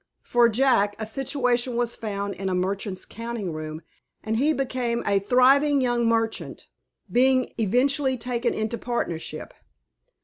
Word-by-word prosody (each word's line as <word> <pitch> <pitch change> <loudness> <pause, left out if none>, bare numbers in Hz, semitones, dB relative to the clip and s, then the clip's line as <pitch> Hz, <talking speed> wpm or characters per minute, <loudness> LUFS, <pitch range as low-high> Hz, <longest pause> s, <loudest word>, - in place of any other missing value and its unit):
For 240 -1 +4
Jack, 225 -4 +2
a 220 - -4
situation 250 0 -1
was 240 -1 0
found 200 -2 -4
in 195 0 -4
a 185 - 0
merchant's 190 +1 -2
counting 230 -5 -5
room, 155 +1 -6 0.4
and 220 +1 -1
he 290 +6 +3
became 255 -4 -1
a 200 -1 +3
thriving 270 +7 +4
young 240 -2 +1
merchant, 225 -1 -1 0.5
being 255 +1 +3
eventually 260 +5 +2
taken 240 0 -1
into 220 +2 -2
partnership. 205 -9 -4
235 Hz, 135 wpm, -25 LUFS, 205-255 Hz, 0.5 s, For